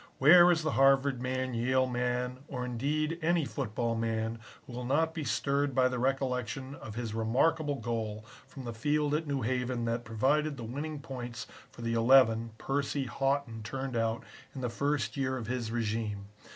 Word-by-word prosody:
Where 175 +5 +8
is 165 -2 +2
the 155 - 0
Harvard 135 -1 +4
man, 130 0 -2
Yale 130 +3 +2
man, 125 0 -1
or 125 -2 -4
indeed 150 +7 -1
any 165 -1 +2
football 115 -3 -2
man 115 0 -2 0.3
who 125 - -11
will 125 +1 -5
not 160 +6 +1
be 160 - -4
stirred 140 -1 0
by 130 -1 +5
the 125 -1 -3
recollection 130 0 -1
of 110 -7 -9
his 115 -2 -4
remarkable 145 +7 +1
goal 110 -3 -3 0.2
from 135 0 -10
the 120 - -4
field 150 +5 0
at 155 +1 0
New 140 -3 -1
Haven 125 0 -1
that 115 +1 -1
provided 140 +6 +1
the 120 - -6
winning 145 +6 -5
points 120 -3 -6 0.2
for 120 - -11
the 115 0 -1
eleven 115 -1 +5
Percy 140 +1 -1
Haughton 135 -3 -1
turned 130 +3 -4
out 115 0 0 0.3
in 130 - -5
the 125 - -1
first 125 -2 -1
year 130 -1 0
of 120 - -5
his 120 -1 -3
régime. 110 -2 -2
130 Hz, 180 wpm, -31 LUFS, 115-140 Hz, 0.3 s, Where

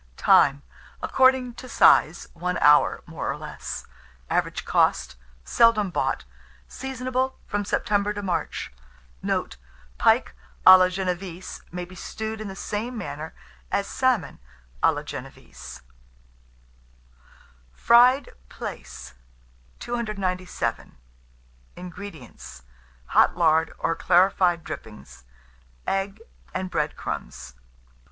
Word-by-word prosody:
Time. 140 +1 +4 0.4
According 260 -2 +3
to 255 - -11
size, 165 -7 +4
1 180 +2 -2
hour, 150 0 +4
more - - -5
or - - -2
less. - - -7 0.5
Average - - -1
cost. - - +1 0.3
Seldom 215 - +3
bought. - - -1 0.4
Seasonable 260 0 -3
from 205 0 -2
September 205 0 0
to 205 -1 -5
March. 170 - -3 0.5
Note. 65 - -2 0.4
Pike - - +3 0.3
à 185 0 +11
la 185 - +5
génévese 185 -1 -5
may 180 +1 -5
be 180 - -15
stewed 220 +4 -6
in 215 - -5
the 195 - -7
same 225 +5 -4
manner 160 -6 -6 0.4
as 200 - 0
salmon 250 - 0 0.4
à - - +5
la - - -5
génévese. - - -10 1.9
FRIED 245 - +4 0.2
PLAICE. 65 +1 -8 0.6
297. 200 -6 -3 0.8
INGREDIENTS. 175 - -10 0.5
Hot - - +4
lard, 160 -1 +3
or 165 - -1
clarified 180 -1 +3
dripping; 105 -1 -8 0.8
egg 195 +2 -2 0.4
and 185 0 -3
bread 150 0 -1
crumbs. 65 +1 -6
185 Hz, 100 wpm, -25 LUFS, 165-220 Hz, 1.9 s, à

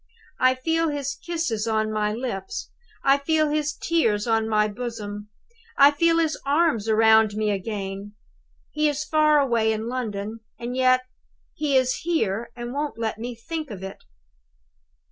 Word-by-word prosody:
I 255 0 +4
feel 325 +5 0
his 285 -1 -2
kisses 285 -9 -3
on 220 -1 0
my 210 -1 0
lips; 215 -5 -5 0.3
I 275 +1 +4
feel 310 +1 +1
his 300 0 0
tears 225 -12 +1
on 225 -1 +1
my 210 -1 +3
bosom; 210 -2 -6 0.5
I 280 +1 +8
feel 330 +3 +2
his 320 -2 +1
arms 280 -7 +1
round 220 -1 +5
me 215 0 0
again. 200 0 -4 0.6
He 305 0 +2
is 290 0 -2
far 305 -1 +4
away 235 -5 +2
in 220 +1 -3
London; 225 -3 -4 0.2
and 240 +1 -5
yet, 255 0 +4 0.5
he 290 -3 +1
is 255 0 +2
here 235 - -1
and 240 0 -6
won't 290 -1 -3
let 220 -1 -3
me 240 +1 -5
think 310 +6 -5
of 195 -4 -8
it! 195 0 -8
240 Hz, 155 wpm, -24 LUFS, 215-290 Hz, 0.6 s, I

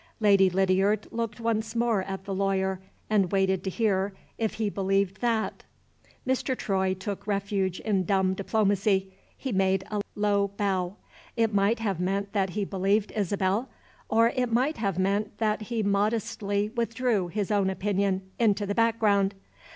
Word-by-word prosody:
Lady 200 -3 +5
Lydiard 195 +3 +2
looked 230 -1 -3
once 225 -1 -1
more 230 -3 +2
at 190 0 -5
the 195 - -3
lawyer, 190 -1 0 0.3
and 200 -4 +2
waited 190 -1 +1
to 190 - -1
hear 195 -1 0 0.3
if 220 -2 -1
he 220 -1 -1
believed 195 -1 0
that. 230 -3 0 0.6
Mr. 260 0 0
Troy 190 -2 0
took 200 +2 -6
refuge 195 -2 -1
in 200 -4 +1
dumb 190 0 +2
diplomacy 195 -1 +1 0.2
he 265 - -4
made 190 -1 +2
a 210 -1 0
low 205 -1 +2
bow. 190 -2 0 0.4
It 225 -2 +2
might 200 +3 +3
have 205 -6 -2
meant 195 +2 -1
that 195 -2 +1
he 205 - 0
believed 195 +2 0
Isabel, 200 +3 0 0.4
or 230 +1 +4
it 250 -2 0
might 260 +7 +1
have 200 -5 -1
meant 200 +2 0
that 215 -1 0
he 230 -2 0
modestly 205 0 0
withdrew 230 -3 0
his 205 +3 -2
own 200 -2 +2
opinion 195 0 0 0.2
into 210 -3 +2
the 200 - -1
background. 210 -3 +2
200 Hz, 155 wpm, -27 LUFS, 190-220 Hz, 0.6 s, Lady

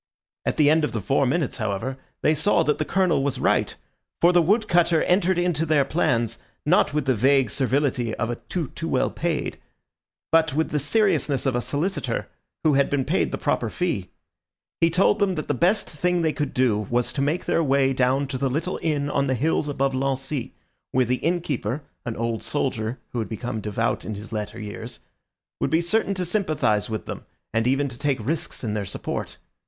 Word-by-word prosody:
At - - 0
the 150 -1 +5
end 160 0 +3
of 150 - -1
the 115 - -1
four 135 +7 +1
minutes, 150 +1 0
however, 110 +3 -2 0.3
they 155 - +4
saw 165 +3 +2
that 150 -1 +1
the 155 - 0
Colonel 185 -7 +2
was 140 -1 -1
right, - - +1 0.4
for 175 +1 +5
the 175 - +6
wood 210 +6 +2
cutter 170 -2 +3
entered 180 0 +2
into 175 -3 +1
their 155 -3 +3
plans, 120 -8 0 0.3
not 175 +2 +4
with 150 -2 -1
the 130 - +3
vague 130 0 +3
servility 130 -3 0
of 115 +1 -2
a 120 - -3
tout 165 -8 -3
too 165 - -4
well - - +1
paid, 165 -2 -2 0.7
but 160 -3 +3
with 160 +1 0
the 150 - +1
seriousness 155 - +1
of 130 -2 +1
a 120 - +1
solicitor 165 +10 -2 0.4
who 155 -2 +4
had 140 0 +3
been 140 -2 0
paid - - +1
the - - -2
proper - - 0
fee. - - -2 0.7
He 165 - +4
told 190 +4 +3
them 195 -3 +2
that 155 - -4
the - - +1
best 185 +5 +2
thing 175 +2 0
they 160 -1 +2
could 145 -3 -3
do 110 -5 +2
was 120 0 0
to 140 - -1
make 150 +5 0
their 165 - +2
way 135 -2 +3
down 130 +2 +2
to 130 -2 -3
the 135 0 +1
little 160 +8 -2
inn 145 -3 0
on 140 -1 0
the 130 - +1
hills 150 +4 +1
above 135 -1 0
Lancy, 135 0 -2 0.4
where 130 0 +3
the 125 +2 +1
innkeeper, 155 -7 -1 0.2
an 115 - -2
old 115 0 -1
soldier 120 -4 -2
who 120 - -3
had 110 - -3
become 115 0 -4
dévot 105 +2 -1
in 110 - -4
his 105 +2 -9
latter 105 -1 -4
years, 110 +3 -7 0.6
would - - 0
be 160 - +3
certain 200 +3 0
to 185 -1 -2
sympathise 155 - 0
with 110 -1 -4
them, - - -6 0.3
and 115 +1 +1
even 135 +2 +2
to 120 -3 -9
take 140 -2 +1
risks 140 +7 -3
in 110 -3 -1
their 105 -1 -1
support. - - -5
140 Hz, 205 wpm, -24 LUFS, 125-165 Hz, 0.7 s, the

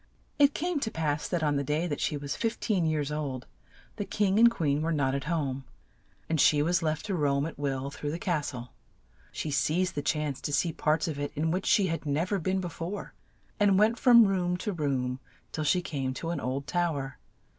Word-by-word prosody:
It 285 0 +5
came 345 -1 -1
to 235 - -1
pass 155 -5 -1
that 175 -3 -1
on 145 -2 +2
the 140 - 0
day 150 +4 0
that 150 -5 -3
she 150 - 0
was 140 0 -4
fif 225 0 -2
teen 190 -7 +1
years 150 -2 -1
old, 140 -4 -3 0.5
the 205 - -1
king 200 0 +1
and 235 +1 +8
queen 150 -9 0
were 165 +1 0
not 135 -4 +1
at 140 -1 -2
home, 140 -5 -1 0.6
and 160 -3 +1
she 145 -1 +5
was 175 +2 +2
left 155 -1 -1
THE 210 -2 -3
SLEEPING - - 0
BEAUTY - - -3
83 145 - +2
to 140 - +2
roam 140 +1 0
at 160 -3 -7
will 135 -1 -2
through 145 +1 -5
the 160 - -2
cas 170 -5 -1
tle. 125 -3 -8 0.6
She 155 - -4
seized 155 +6 +1
the 145 - -2
chance 150 -2 -1
to - - -3
see 165 +3 +1
parts 155 +2 +1
of 150 -3 -4
it 145 - -3
in 160 +2 0
which 185 +3 -1
she 230 -4 +4
had 165 -3 -3
nev 155 +6 0
er 200 - +1
been 190 +3 0
be 175 - -4
fore, 175 +5 -6 0.5
and 200 -2 +4
went 220 +3 +3
from 235 -3 +7
room 180 -2 0
to 205 +2 -3
room 135 -5 -1 0.3
till 155 - -3
she 180 +4 +2
came 135 -5 -3
to 165 +3 -3
an 170 - -2
old 135 +2 -3
tow 175 -1 0
er. 135 -1 -6
155 Hz, 240 wpm, -29 LUFS, 145-185 Hz, 0.6 s, and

